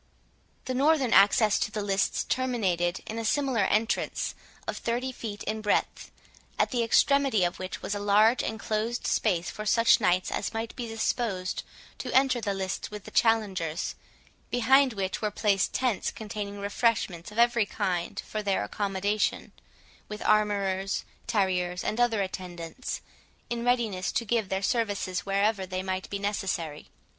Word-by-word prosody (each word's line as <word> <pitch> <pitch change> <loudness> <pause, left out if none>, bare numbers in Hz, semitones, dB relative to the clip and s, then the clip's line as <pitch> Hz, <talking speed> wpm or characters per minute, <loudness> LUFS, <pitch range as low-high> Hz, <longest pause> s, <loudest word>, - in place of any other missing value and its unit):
The 255 - -2
northern 275 -1 +3
access 205 +2 +5
to - - 0
the 215 -1 -3
lists 195 -1 +1
terminated 190 -9 0
in 225 +1 -5
a - - -3
similar 250 -3 +1
entrance 225 +2 0 0.3
of - - -3
thirty 245 +3 -1
feet 215 -5 -6
in 220 0 -3
breadth, 210 -1 0 0.5
at - - +2
the 245 -2 +1
extremity 270 -2 +3
of 175 - -1
which 185 0 -6
was - - -2
a 205 - -2
large 210 +4 +4
enclosed 220 +1 -2
space 175 -6 +1
for 215 - -6
such 230 +2 +4
knights 185 -2 +2
as - - -3
might 225 0 -3
be 240 -2 -4
disposed 220 -4 -1 0.4
to - - -4
enter 260 -2 +4
the 200 -3 -1
lists 190 -1 -3
with 210 -2 -8
the - - -11
challengers, 200 -8 +1 0.6
behind 265 +2 +4
which 195 -2 -3
were 210 - +1
placed 200 -1 +1
tents 250 -6 0
containing 205 -2 -6
refreshments 200 -3 0
of 210 - -11
every 235 -2 +4
kind 185 +2 -2
for 215 - -3
their 200 - 0
accommodation, 200 - -1 0.6
with 210 0 -6
armourers, 200 -2 +1 0.2
tarriers, 180 -3 0
and 215 - -2
other 225 -4 +3
attendants, 180 +2 -6 0.5
in 235 0 -2
readiness 230 -7 +1
to 230 - -1
give 220 -3 0
their 190 +1 -1
services 205 -5 -1
wherever 200 0 +1
they 185 0 -3
might 185 0 -3
be 200 - -2
necessary. 190 -7 -3
210 Hz, 155 wpm, -28 LUFS, 190-230 Hz, 0.6 s, access